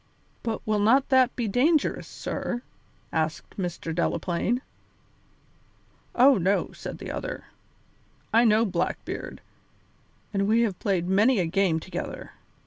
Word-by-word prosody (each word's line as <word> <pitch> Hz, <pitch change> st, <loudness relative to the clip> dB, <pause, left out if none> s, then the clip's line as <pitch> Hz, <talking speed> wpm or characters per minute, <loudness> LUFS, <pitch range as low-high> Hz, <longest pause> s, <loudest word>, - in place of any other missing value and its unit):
"But 225 Hz, -2 st, -4 dB
will 215 Hz, -1 st, +1 dB
not 250 Hz, +7 st, +4 dB
that 260 Hz, -2 st, +4 dB
be 235 Hz, -3 st, -1 dB
dangerous, 280 Hz, +9 st, +2 dB
sir?" 240 Hz, 0 st, -4 dB, 0.5 s
asked 160 Hz, 0 st, -2 dB
Mr. 175 Hz, -3 st, -4 dB
Delaplaine. 175 Hz, +8 st, 0 dB, 1.5 s
"Oh, 260 Hz, -2 st, +6 dB
no," 190 Hz, +3 st, +1 dB
said -, -, -7 dB
the -, -, -6 dB
other. -, -, -5 dB, 0.9 s
"I 230 Hz, +2 st, +6 dB
know 225 Hz, 0 st, +4 dB
Blackbeard, 180 Hz, -5 st, -3 dB, 0.9 s
and 195 Hz, 0 st, +1 dB
we 225 Hz, +2 st, +4 dB
have 210 Hz, -6 st, 0 dB
played 185 Hz, -5 st, 0 dB
many 210 Hz, +7 st, +4 dB
a 180 Hz, -, +2 dB
game 165 Hz, -1 st, +1 dB
together. -, -, -6 dB
210 Hz, 125 wpm, -26 LUFS, 180-240 Hz, 1.5 s, Oh